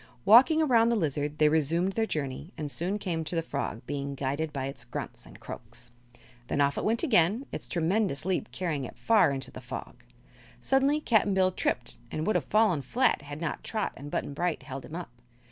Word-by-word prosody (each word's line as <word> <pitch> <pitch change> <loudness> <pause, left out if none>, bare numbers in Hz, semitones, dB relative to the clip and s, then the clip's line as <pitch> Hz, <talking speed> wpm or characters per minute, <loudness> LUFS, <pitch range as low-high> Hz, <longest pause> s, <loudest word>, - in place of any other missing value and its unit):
Walking 270 +9 +7
around 235 -5 +4
the 235 - +2
lizard 150 -5 -1
they 155 - +5
resumed 160 +5 +2
their 225 +1 0
journey 145 +1 -4
and 150 -3 -3
soon 185 +7 0
came 170 -5 -2
to 165 - -4
the 165 - 0
frog, 140 -7 -4
being 140 -1 -4
guided 140 +4 -2
by 135 -3 -3
its 135 -3 -6
grunts 120 - -7
and - - -14
croaks. 120 0 -7 0.6
Then - - -1
off 140 0 +3
it - - -2
went 230 +2 +2
again, 220 - +3
its - - -5
tremendous 175 -2 0
leap 185 -1 -1
carrying 165 -7 -2
it 125 - -8
far 225 -8 +4
into 135 -1 -4
the - - -9
fog. - - -8 0.6
Suddenly 275 +3 +2
Cap'n 220 -7 +3
Bill 185 -1 +3
tripped 125 -9 -1
and 155 - -3
would 215 - +1
have - - +1
fallen 210 -8 +3
flat 245 - +2
had 145 +1 -8
not 165 -2 -3
Trot 215 -2 -2
and 145 +2 -8
Button 145 - -3
Bright 175 +2 -1
held 135 -2 -7
him 155 - -8
up. 175 -7 -6
165 Hz, 205 wpm, -28 LUFS, 140-215 Hz, 0.6 s, Walking